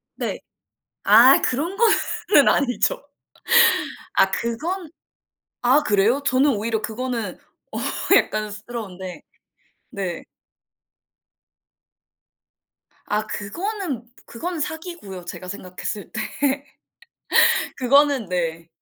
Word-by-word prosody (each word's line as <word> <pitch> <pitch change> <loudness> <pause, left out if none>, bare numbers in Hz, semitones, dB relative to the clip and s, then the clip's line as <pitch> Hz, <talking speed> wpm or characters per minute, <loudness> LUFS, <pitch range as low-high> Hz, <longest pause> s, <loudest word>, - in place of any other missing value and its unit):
네. - - -4 0.6
아 235 +6 +7
그런 320 +9 -1
거는 420 -7 +3
아니죠. 285 - +1 1.1
아 - - +4
그건 315 +9 -3 0.7
아 255 +5 +4
그래요? 215 +5 +2
저는 275 +2 +3
오히려 220 +1 -2
그거는 230 -3 -4 0.3
어 - - -5 0.4
약간스러운데. 210 -3 -3 0.7
네. 185 -4 -4 2.8
아 210 +1 -1
그거는 335 - -4 0.2
그거는 340 +8 -5
사기고요, 305 - -6
제가 180 +1 -8
생각했을 185 +2 -6
때. - - -3 1.6
그거는 275 -1 +3
네. 165 -2 -2
235 Hz, 170 characters per minute, -22 LUFS, 205-295 Hz, 2.8 s, 아